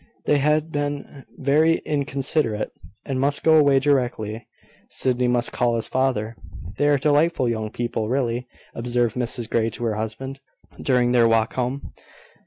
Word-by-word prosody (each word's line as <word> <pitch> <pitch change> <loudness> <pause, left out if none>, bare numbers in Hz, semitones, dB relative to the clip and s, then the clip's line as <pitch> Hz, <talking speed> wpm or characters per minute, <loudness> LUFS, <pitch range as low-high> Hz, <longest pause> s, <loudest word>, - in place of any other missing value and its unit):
They 145 - +3
had 150 +2 +1
been 145 -1 -4
very 155 +4 +3
inconsiderate, 140 -5 -1 0.3
and 135 -2 -2
must 140 +1 +1
go 160 - +5
away 145 -3 +5
directly. 120 -5 0 0.4
Sydney 125 -1 +1
must 120 0 +1
call 120 -1 +1
his 115 - -2
father. 125 -4 0 0.4
"They 145 - +2
are 145 -1 +4
delightful 145 0 +2
young 110 -2 -2
people, 115 -1 -3
really," 125 -1 -1 0.3
observed 120 -1 -1
Mrs 120 -2 -1
Grey 115 -1 +1
to 115 - -7
her 110 -2 0
husband, 115 +5 -5 0.4
during 125 -2 +2
their 120 -2 +5
walk 115 0 +2
home. 130 +2 -3
125 Hz, 150 wpm, -23 LUFS, 115-145 Hz, 0.4 s, go